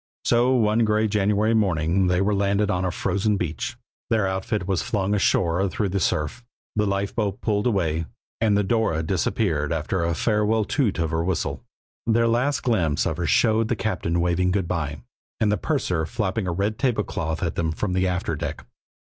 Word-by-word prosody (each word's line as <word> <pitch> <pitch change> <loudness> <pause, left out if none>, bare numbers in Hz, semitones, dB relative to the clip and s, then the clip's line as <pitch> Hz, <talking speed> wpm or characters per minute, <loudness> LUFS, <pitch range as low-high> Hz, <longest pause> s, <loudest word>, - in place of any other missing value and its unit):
So, 120 +2 +3
one 110 -2 +2
gray 110 0 +2
January 105 +1 +2
morning 95 -3 +2
they 90 +1 +2
were 105 +2 +2
landed 100 +1 +1
on 90 0 0
a 90 - +1
frozen 100 +4 0
beach, 90 - -3 0.3
their 110 -3 +2
outfit 95 +1 -2
was 95 -3 +1
flung 100 -1 -1
ashore 95 -2 +2
through 100 +1 -1
the 100 +2 -1
surf, 95 +9 -1 0.3
the 105 -1 +1
lifeboat 100 +1 -1
pulled 105 0 0
away, 85 -7 0 0.3
and 105 -3 +3
the 105 - +2
Dora 100 -6 +1
disappeared 80 -3 0
after 80 +3 -1
a 85 -1 0
farewell 105 +1 +1
toot 115 -5 0
of 85 -2 -1
her 80 0 0
whistle. 90 -2 -2 0.4
Their 115 0 +3
last 125 +4 +1
glimpse 85 - +1
of 80 - -1
her 85 -1 -1
showed 110 -1 +3
the 120 - 0
captain 90 -5 -1
waving 90 +1 +1
good 95 -1 0
by 75 -6 -3 0.4
and 105 -1 +2
the - - +3
purser 90 - -1
flapping 105 -2 -2
a - - 0
red 100 +5 -1
tablecloth 95 - -1
at 85 - -1
them 80 -1 -1
from 90 +4 -2
the 95 0 +1
after 90 -2 -1
deck. 75 - -5
100 Hz, 185 wpm, -24 LUFS, 85-110 Hz, 0.4 s, So